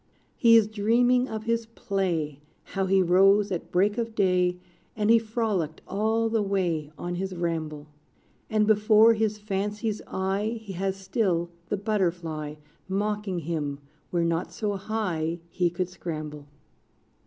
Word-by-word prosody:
He 230 -1 +6
is 225 - +5
dreaming 240 +4 +2
of 220 -1 -4
his 230 0 -1
play 185 - -2 0.2
How 195 -1 -2
he 190 0 +4
rose 195 +3 +4
at 175 - -4
break 205 +5 +2
of 230 -1 -3
day, 180 -3 +2 0.4
And 215 0 +2
he 230 - +7
frolicked 215 -8 -2
all 220 +3 +1
the 225 -1 +1
way 175 -7 -1
On 175 0 -4
his 190 +1 -3
ramble. 160 -4 -3 0.6
And 215 -1 +3
before 215 +1 +6
his 215 -1 0
fancy's 210 +1 -2
eye, 195 +4 -1
He 200 -3 -7
has 190 +1 -1
still 185 -4 -1 0.2
the 205 - 0
butterfly 170 -7 -1 0.3
Mocking 200 -1 -1
him, 150 -3 -3 0.3
where 170 -1 +1
not 170 +1 -1
so 210 -2 -2
high 185 -6 -2
He 180 -1 +1
could 175 +1 -2
scramble. 155 -5 -6
195 Hz, 145 wpm, -27 LUFS, 175-215 Hz, 0.6 s, he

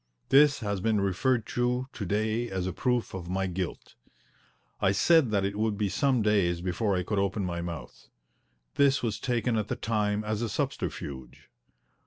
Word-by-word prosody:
This 145 0 +5
has 100 -3 -2
been 110 0 +2
referred 105 +5 +1
to 125 +2 -1
to 105 - -5
day 110 +4 0
as 95 -1 -2
a 95 - -2
proof 125 0 -1
of 90 -2 -6
my 95 +1 0
guilt. 90 -1 -4 0.9
I 95 - +3
said 150 - +4
that 100 -2 +1
it 100 +1 -2
would 110 -2 0
be 105 -1 0
some 130 - +1
days 100 -5 +2
before 95 +3 0
I 90 - 0
could 105 +2 -1
open 100 0 0
my 85 -1 -3
mouth. 85 -3 -8 0.7
This 140 -1 +4
was 105 -3 -1
taken 120 -1 0
at 105 -1 -1
the - - -2
time 105 -2 -1
as 105 +1 -2
a 115 - -1
subterfuge. 65 -9 -4
105 Hz, 180 wpm, -28 LUFS, 95-120 Hz, 0.9 s, This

